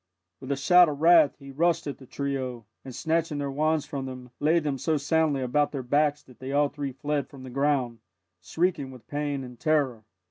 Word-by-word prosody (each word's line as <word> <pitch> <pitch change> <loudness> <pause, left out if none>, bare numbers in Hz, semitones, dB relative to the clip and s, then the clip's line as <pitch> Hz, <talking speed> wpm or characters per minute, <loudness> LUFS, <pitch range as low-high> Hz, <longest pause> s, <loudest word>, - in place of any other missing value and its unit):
With 135 +1 -6
a - - +2
shout 175 +5 +6
of 145 -1 -5
wrath 165 -2 +6
he 140 -1 -11
rushed 170 +5 +1
at 145 - -5
the 130 - -14
trio, 130 -5 -4 0.2
and 130 -2 -9
snatching 160 -1 0
their 140 -1 -2
wands 155 +1 +1
from 135 -3 -5
them, 125 -1 -9
laid 160 +3 +2
them 140 -3 -2
so 155 +4 +1
soundly 145 -1 +1
about 145 +4 +1
their 135 -3 -4
backs 145 +3 +1
that 125 - -19
they 130 +1 -6
all 145 0 +3
three 140 -2 -5
fled 145 +2 -2
from 135 -2 -12
the 130 - -9
ground, 135 -3 0 0.4
shrieking 165 -5 -1
with 130 -3 -13
pain 145 -2 -2
and 125 -2 -11
terror. 140 -8 +1
140 Hz, 210 wpm, -27 LUFS, 130-150 Hz, 0.4 s, shout